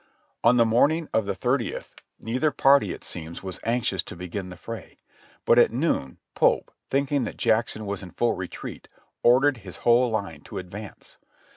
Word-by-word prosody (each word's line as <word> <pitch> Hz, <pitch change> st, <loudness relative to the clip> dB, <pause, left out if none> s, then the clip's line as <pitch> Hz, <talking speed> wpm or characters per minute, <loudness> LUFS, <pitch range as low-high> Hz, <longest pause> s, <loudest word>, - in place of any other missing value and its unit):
On 120 Hz, +1 st, +5 dB
the 115 Hz, -, +6 dB
morning 145 Hz, +8 st, +2 dB
of 110 Hz, -3 st, +1 dB
the -, -, -1 dB
thirtieth 125 Hz, -1 st, -2 dB, 0.2 s
neither 130 Hz, +7 st, 0 dB
party, 140 Hz, -1 st, +4 dB
it -, -, -8 dB
seems, 85 Hz, +1 st, -7 dB
was 95 Hz, -1 st, -6 dB
anxious 115 Hz, -5 st, 0 dB
to -, -, -10 dB
begin 90 Hz, +2 st, -5 dB
the 90 Hz, -, -9 dB
fray; 115 Hz, -1 st, -8 dB, 0.5 s
but 120 Hz, -, +6 dB
at -, -, +5 dB
noon 115 Hz, -, -1 dB, 0.2 s
Pope, -, -, +2 dB, 0.2 s
thinking 140 Hz, 0 st, +1 dB
that -, -, -6 dB
Jack 115 Hz, 0 st, +2 dB
son 110 Hz, -, -6 dB
was 100 Hz, -1 st, -3 dB
in 95 Hz, -, -9 dB
full 120 Hz, +5 st, +1 dB
retreat, 90 Hz, -1 st, -7 dB, 0.3 s
ordered 130 Hz, +3 st, +5 dB
his 95 Hz, -5 st, -10 dB
whole 120 Hz, +1 st, +5 dB
line 100 Hz, -9 st, -3 dB
to -, -, -9 dB
advance. 95 Hz, +3 st, -9 dB
115 Hz, 175 wpm, -25 LUFS, 95-125 Hz, 0.5 s, the